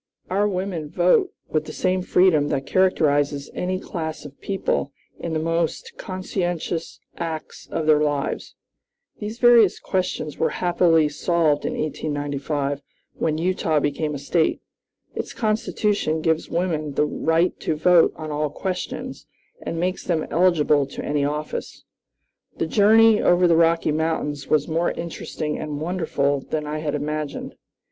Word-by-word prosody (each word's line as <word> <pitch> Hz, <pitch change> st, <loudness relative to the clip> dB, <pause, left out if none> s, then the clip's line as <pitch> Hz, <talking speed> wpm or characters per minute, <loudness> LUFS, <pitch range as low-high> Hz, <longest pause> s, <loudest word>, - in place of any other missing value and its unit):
Our 200 Hz, +2 st, +2 dB
women 185 Hz, -5 st, -3 dB
vote 180 Hz, -, +3 dB, 0.2 s
with 155 Hz, -1 st, -1 dB
the -, -, -7 dB
same 185 Hz, 0 st, 0 dB
freedom 180 Hz, -5 st, +3 dB
that 135 Hz, -2 st, -1 dB
characterizes 145 Hz, -6 st, +2 dB
any 185 Hz, +1 st, -2 dB
class 160 Hz, -5 st, -5 dB
of 140 Hz, -1 st, -12 dB
people 190 Hz, -7 st, -1 dB, 0.3 s
in 170 Hz, -, -4 dB
the -, -, +1 dB
most 165 Hz, 0 st, -2 dB
conscientious 175 Hz, -3 st, -3 dB, 0.2 s
acts 160 Hz, -2 st, -6 dB
of 160 Hz, -, -2 dB
their 155 Hz, -1 st, +5 dB
lives." 145 Hz, -2 st, -2 dB, 0.6 s
These 215 Hz, +2 st, -5 dB
various 240 Hz, -5 st, +6 dB
questions 180 Hz, -5 st, -2 dB
were -, -, +2 dB
happily 170 Hz, -3 st, +3 dB
solved 150 Hz, 0 st, +1 dB
in -, -, -1 dB
1895, 145 Hz, -1 st, -2 dB, 0.4 s
when 155 Hz, -1 st, 0 dB
Utah 165 Hz, -2 st, +1 dB
became 145 Hz, +1 st, -1 dB
a -, -, -3 dB
State. 160 Hz, +4 st, +1 dB, 0.5 s
Its -, -, -5 dB
Constitution 210 Hz, -6 st, 0 dB
gives 160 Hz, 0 st, 0 dB
women 160 Hz, -4 st, -1 dB
the 150 Hz, -, +3 dB
right 165 Hz, +3 st, +1 dB
to 155 Hz, -, -1 dB
vote 170 Hz, +2 st, +5 dB
on 155 Hz, -1 st, -6 dB
all 150 Hz, 0 st, -1 dB
questions, 185 Hz, +4 st, -5 dB, 0.3 s
and 165 Hz, -, -4 dB
makes 185 Hz, +2 st, -1 dB
them 165 Hz, -3 st, 0 dB
eligible 155 Hz, -5 st, +3 dB
to -, -, -7 dB
any 145 Hz, -1 st, 0 dB
office. 150 Hz, +2 st, -4 dB, 0.7 s
The -, -, 0 dB
journey 220 Hz, +4 st, +5 dB
over 175 Hz, 0 st, +4 dB
the 170 Hz, -, +4 dB
Rocky 165 Hz, -1 st, +3 dB
Mountains 150 Hz, -2 st, -1 dB
was 150 Hz, -2 st, +2 dB
more 165 Hz, +1 st, +1 dB
interesting 155 Hz, -2 st, -4 dB
and 150 Hz, -2 st, -4 dB
wonderful 155 Hz, -4 st, 0 dB
than 150 Hz, +2 st, -3 dB
I 150 Hz, +1 st, -3 dB
had 150 Hz, -1 st, -2 dB
imagined. 150 Hz, 0 st, -4 dB
160 Hz, 145 wpm, -23 LUFS, 150-180 Hz, 0.7 s, various